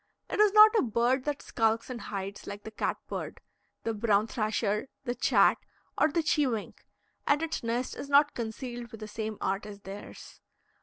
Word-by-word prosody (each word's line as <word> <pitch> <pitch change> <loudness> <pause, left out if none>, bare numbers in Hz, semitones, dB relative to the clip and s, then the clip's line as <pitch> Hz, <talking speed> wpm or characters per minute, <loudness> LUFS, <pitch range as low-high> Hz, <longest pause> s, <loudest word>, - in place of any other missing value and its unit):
It - - -2
is 425 -1 +6
not 430 +1 +9
a - - +4
bird 245 +3 +1
that 295 -1 -2
skulks 225 0 0
and 250 -2 -6
hides, 195 0 -6
like 205 0 -7
the 220 - -8
cat 215 - -2
bird, - - -5 0.4
the 225 - -1
brown 210 -1 +2
thrasher, 215 0 -1 0.2
the 245 -2 -2
chat, - - +4 0.4
or - - +4
the 335 +1 +1
cheewink, 260 -8 -1 0.4
and 290 +2 +3
its 325 - -2
nest 235 +2 -2
is 280 - -7
not 285 +1 +5
concealed 240 +1 -5
with 225 - -9
the 215 - -7
same 215 0 -4
art 195 +2 -1
as 205 -1 -10
theirs. 195 +1 -10
230 Hz, 185 wpm, -29 LUFS, 210-270 Hz, 0.4 s, not